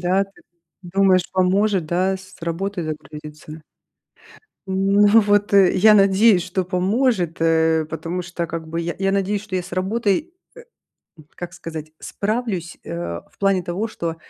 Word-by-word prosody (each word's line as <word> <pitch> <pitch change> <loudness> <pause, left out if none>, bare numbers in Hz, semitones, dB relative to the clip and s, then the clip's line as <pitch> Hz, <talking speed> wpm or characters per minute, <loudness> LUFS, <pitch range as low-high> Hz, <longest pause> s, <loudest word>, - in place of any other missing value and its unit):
да, 185 +2 +2
ты 195 0 -22 0.4
думаешь 185 0 +3
поможет, 190 0 +2
да, 185 +4 +1
с 190 0 -15
работой 175 +2 -3
загрузиться? 150 0 -8 1.0
Ну 195 +2 +3
вот, 205 0 +2
э, 195 -2 +6
я 210 +3 +6
надеюсь, 195 0 +5
что 185 +1 -2
поможет, 185 - 0
э, 160 -1 +2
потому 165 +3 -4
что 175 -1 -4
как 165 -1 -6
бы 165 +1 -3
я 170 0 -3
я 195 0 0
надеюсь, 200 +1 0
что 210 -3 -4
я 180 - -1
с 180 - -13
работой, 200 +3 0 1.0
э, - - -15
м, 150 - -19
как 175 0 -7
сказать, 160 -3 -8
справлюсь, 205 -5 -3
э, 85 0 -5
в - - -31
плане 195 -2 +2
того, 175 +6 -3
что 170 -6 -4
185 Hz, 155 wpm, -21 LUFS, 165-195 Hz, 1.0 s, э